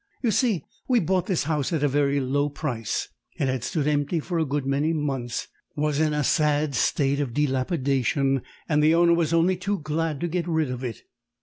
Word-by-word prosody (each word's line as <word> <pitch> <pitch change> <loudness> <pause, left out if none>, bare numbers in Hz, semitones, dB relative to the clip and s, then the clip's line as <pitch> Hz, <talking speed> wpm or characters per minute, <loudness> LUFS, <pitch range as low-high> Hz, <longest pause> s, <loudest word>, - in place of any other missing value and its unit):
"You 235 - +3
see, 215 - +1 0.2
we 250 -2 +4
bought 185 0 0
this 185 -5 +1
house 150 -1 -1
at 160 -4 0
a - - +4
very 140 0 +2
low 140 +2 0
price; 130 -7 -3 0.3
it 140 - 0
had 130 -2 -1
stood 150 +2 -1
empty 145 +3 +1
for 170 +2 -2
a 160 - +1
good 140 0 -1
many 140 +4 +1
months, 135 -6 -2 0.3
was 150 -1 0
in 155 -1 +2
a 150 0 0
sad 150 0 +2
state 140 +2 +1
of 130 -5 -2
dilapidation, 135 -1 +1 0.3
and 150 -1 +2
the 155 +2 +5
owner 170 0 +5
was 165 -2 +1
only 170 +2 +3
too 200 +3 -1
glad 155 -1 -2
to 175 - 0
get 175 0 -2
rid 160 -5 0
of 125 0 -5
it. 120 -3 -5
150 Hz, 205 wpm, -25 LUFS, 140-165 Hz, 0.3 s, the